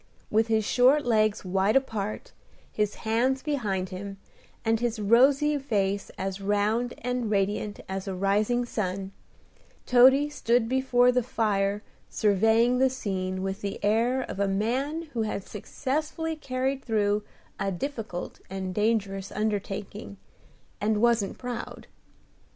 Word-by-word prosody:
With 220 +1 +3
his 220 -2 +1
short 265 +6 +4
legs 215 -3 +2
wide 190 +4 +1
apart, 220 -6 -1 0.4
his 210 -1 -1
hands 250 +4 +1
behind 205 -11 -1
him, 195 +1 -7 0.5
and 225 0 +2
his 235 -1 -1
rosy 270 +7 +4
face 200 -7 -1
as 195 +1 -4
round 210 +4 0
and 250 -2 -1
radiant 205 0 -1
as 190 +1 -4
a 190 - -3
rising 210 +6 +1
sun, 195 -4 -3 0.7
Toady 260 +4 +6
stood 240 -5 +1
before 250 -1 +3
the 250 0 +2
fire 210 -3 0 0.3
surveying 225 +4 +3
the 265 0 +4
scene 185 -6 -3
with 195 +2 -3
the 200 -1 -4
air 235 +5 +2
of 195 - -7
a 200 - +2
man 255 +11 -1
who 230 - -1
has 210 -3 -3
successfully 305 - -3
carried 265 -2 -2
through 210 -2 +1 0.4
a 195 - -1
difficult 215 -3 -5
and 190 -1 -4
dangerous 200 -2 0
undertaking, 205 -1 -3 0.6
and 210 0 +1
wasn't 230 -3 +2
proud. 245 -2 -6
220 Hz, 130 wpm, -27 LUFS, 200-250 Hz, 0.7 s, Toady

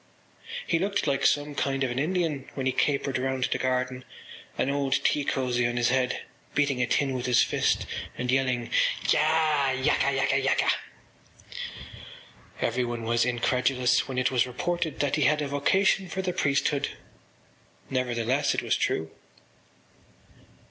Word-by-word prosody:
He 165 - +1
looked 200 +2 0
like 140 -2 0
some 145 0 0
kind 135 0 -1
of 130 - -1
an 120 - -2
Indian 160 -3 -1
when 135 - -3
he 130 - +2
capered 140 -1 0
round 130 0 -1
the - - 0
garden, 130 0 -1 0.5
an 140 - +1
old 140 -1 0
tea 145 - +2
cosy 125 -3 0
on 120 0 -3
his 120 0 +2
head, 125 0 0 0.3
beating 140 -3 +1
a 125 - +1
tin 135 +2 +1
with 125 -1 -3
his 125 -1 +5
fist - - 0 0.3
and 125 0 -1
yelling: 130 -3 0 0.4
“Ya! 155 -2 +3
yaka, 130 +1 +1
yaka, 135 0 +1
yaka!” 135 +1 +2 1.9
Everyone 120 -1 -1
was 115 +1 +1
incredulous 125 +1 +1
when 130 -2 -5
it 130 0 +2
was 130 0 +2
reported 170 +6 -2
that 145 0 +1
he 150 - +2
had 150 +2 +3
a 145 - -1
vocation 190 +7 +2
for 190 +3 -3
the 180 -1 -1
priesthood. 140 -1 +1 1.0
Nevertheless 125 +1 0
it - - -1
was - - +1
true. 80 0 -1
135 Hz, 150 wpm, -27 LUFS, 125-145 Hz, 1.9 s, his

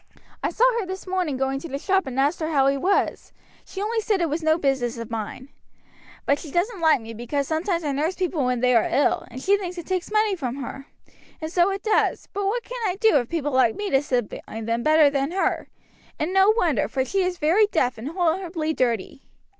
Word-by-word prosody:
I - - 0
saw 465 - 0 0.2
her 420 - -2
this 375 0 -6
morning 365 -7 -1
going 265 +1 -1
to 335 - -8
the 275 - -3
shop 380 +1 +1
and 260 0 -3
asked 285 +5 +2
her 315 -1 -2
how 280 -4 +3
he 275 0 +3
was; 375 +9 0 0.3
she 380 - -9
only 445 +1 0
said 415 -2 0
it 335 -4 0
was 315 +3 -1
no 315 0 +3
business 265 -6 0
of 230 0 -7
mine. 230 +4 -5 0.8
But 285 +1 +2
she 315 - -9
doesn't 360 - -1
like 320 -4 +4
me 225 0 -8
because 250 +5 -3
sometimes 335 +2 -1
I 295 - -1
nurse 305 +6 -1
people 355 -6 -1
when 250 -1 0
they 250 0 +3
are 230 - +3
ill, 285 - +1
and 250 +1 -8
she 400 +1 +3
thinks 360 -2 -5
it 345 - -6
takes 370 -1 -2
money 430 -2 +2
from 260 -7 -4
her; 275 +1 -7 0.5
and 315 0 -5
so 355 +1 +3
it 390 0 -4
does, 435 - +1
but 400 0 -1
what 470 +4 -1
can - - -7
I 365 - -1
do 440 -5 +4
if 245 -3 -1
people 300 -4 -2
like 255 -4 +3
me 410 -1 -4
to 270 - +4
sit 250 -6 -1
by 225 - -8
them 230 +1 -1
better 310 +1 +5
than 275 0 0
her? 385 - 0 0.5
and 325 +5 -2
no 385 +1 +5
wonder, 345 - +2
for 260 +4 -1
she 390 +7 0
is 365 -1 -1
very 350 +8 +3
deaf 255 - 0
and 235 - -6
horribly 330 -1 -1
dirty." 240 -2 -1
315 Hz, 235 wpm, -24 LUFS, 265-375 Hz, 0.8 s, better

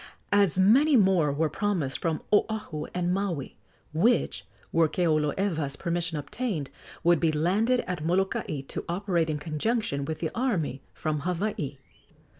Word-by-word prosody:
As 200 -5 +3
many 260 +11 +5
more 185 -8 +4
were 155 +3 +1
promised 170 -7 -1
from 165 -2 -1
Oahu 210 -7 0
and 180 0 0
Maui, 185 -8 -2 0.4
which, 215 +10 +1 0.2
were 165 -1 +3
Keoloewa's 155 -2 0
permission 170 0 -2
obtained, 155 - -3 0.3
would 175 -1 +4
be 165 -2 +2
landed 200 +11 +2
at 180 -4 -4
Molokai 175 -4 0
to 135 - -6
operate 175 -2 0
in 155 - -1
conjunction 155 +1 -1
with 155 +2 -3
the 160 - -3
army 180 - -1
from 155 -1 -2
Hawaii. 170 -4 -2
170 Hz, 135 wpm, -27 LUFS, 155-200 Hz, 0.4 s, many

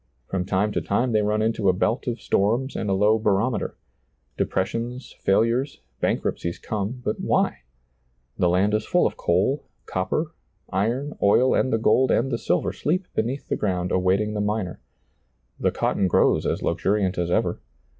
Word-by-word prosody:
From 90 +5 -2
time 100 +2 +1
to - - -1
time 120 +5 0
they 110 -1 +3
run 105 +1 +1
into 110 -3 +1
a - - +4
belt 110 +8 0
of 120 -1 -2
storms 120 +7 0
and 105 - -2
a - - +2
low 105 +3 +3
barometer; 105 +2 0 0.6
depressions, 115 +6 -2
fail 95 +2 +3
ures, 125 +5 0 0.2
bankruptcies 85 0 -1
come; 110 +4 -4
but 105 - -1
why? - - +1 0.8
The 90 - +2
land 95 +4 +2
is 110 0 +1
full - - +2
of - - 0
coal, 95 +12 0 0.2
copper, 155 - -2 0.4
iron, 120 +10 -1
oil, 120 +6 +4
and 130 - +1
the 115 - +3
gold 130 +3 +3
and 135 +3 +2
the 115 - -1
silver 90 +2 0
sleep 180 - -1
beneath 130 +5 -2
the - - 0
ground 90 -3 -1
awaiting 95 +3 +1
the 105 - -1
miner; 105 -3 -2 0.8
the - - +2
cotton 95 - 0
grows - - +3
as - - -1
luxuriant 95 -3 0
as 85 -1 -1
ever. - - 0
105 Hz, 170 wpm, -24 LUFS, 95-120 Hz, 0.8 s, a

